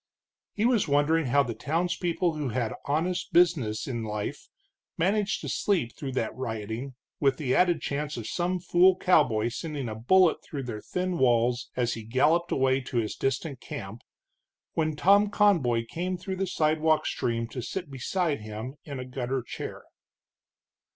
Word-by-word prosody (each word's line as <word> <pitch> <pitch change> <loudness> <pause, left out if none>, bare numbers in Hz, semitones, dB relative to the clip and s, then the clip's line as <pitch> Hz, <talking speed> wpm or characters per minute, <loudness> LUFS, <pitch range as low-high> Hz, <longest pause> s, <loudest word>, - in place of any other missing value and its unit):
He 210 - +1
was 240 -7 +3
wondering 145 +2 +2
how 140 +3 +4
the 120 -3 -4
townspeople 170 +4 -1
who 150 -4 -3
had 120 -1 -1
honest 165 +5 -1
business 155 -12 +3
in 120 -4 -3
life 105 -1 -4 0.5
managed 200 +4 +1
to - - -6
sleep 145 - 0
through 135 -3 -5
that 115 -4 -2
rioting, 115 +1 -5 0.2
with 135 -2 +2
the 130 -4 -1
added 175 -3 +3
chance 145 +1 -3
of 115 - -5
some 180 +9 -1
fool 180 +1 +4
cowboy 120 -13 +3
sending 145 0 -4
a 110 - -4
bullet 165 +10 +3
through 140 -3 -5
their 115 -4 -5
thin 180 - -2
walls 120 0 +2
as 120 -1 0
he 115 - -6
galloped 150 +10 +2
away 130 0 +2
to 125 -1 -5
his 110 -2 -1
distant 135 +1 -2
camp, 110 +2 -7 0.7
when 155 -1 0
Tom 200 +6 +5
Conboy 155 - +3
came 180 +5 -3
through 190 +1 -5
the 195 0 -1
sidewalk 155 -1 +2
stream 115 -1 -1
to 125 - -5
sit 175 +4 -5
beside 145 - -1
him 110 +6 -7
in 140 -3 -6
a 125 - -5
gutter 130 0 -3
chair. - - -7
140 Hz, 165 wpm, -27 LUFS, 120-175 Hz, 0.7 s, Tom